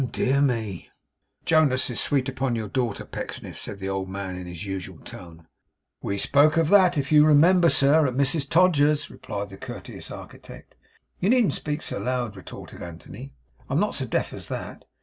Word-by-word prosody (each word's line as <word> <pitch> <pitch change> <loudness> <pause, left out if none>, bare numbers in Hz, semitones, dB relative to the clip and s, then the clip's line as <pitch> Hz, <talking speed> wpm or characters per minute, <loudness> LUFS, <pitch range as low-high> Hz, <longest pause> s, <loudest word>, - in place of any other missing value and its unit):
Ahem! 130 - -1
Dear 135 +2 +1
me!' 115 -9 -1 0.6
'Jonas 150 -5 +3
is 120 - -2
sweet 135 -3 +1
upon 130 -2 -1
your 110 -2 -3
daughter, 120 -2 -2
Pecksniff,' - - -7
said 100 - -6
the 95 0 -5
old 95 -1 -3
man, 95 -1 -5
in 90 0 -7
his 90 +2 -7
usual 95 -2 -6
tone. 85 -2 -12 0.6
'We 100 - -2
spoke 145 - +3
of 165 -2 +2
that, 190 -4 +5
if 140 0 -2
you 150 -1 +7
remember, 170 +4 +5
sir, 145 +2 +4
at 125 - -3
Mrs 140 +1 +1
Todgers's,' 150 -4 +3
replied 100 0 -6
the 95 - -10
courteous - - -9
architect. - - -11 0.5
'You 190 - +1
needn't 245 -4 +3
speak 150 0 -3
so - - -3
loud,' 125 -4 -2
retorted 95 - -11
Anthony. 95 +10 -10 0.3
'I'm - - +1
not - - 0
so - - -2
deaf - - -1
as - - -8
that. - - -7
130 Hz, 185 wpm, -25 LUFS, 100-150 Hz, 0.6 s, you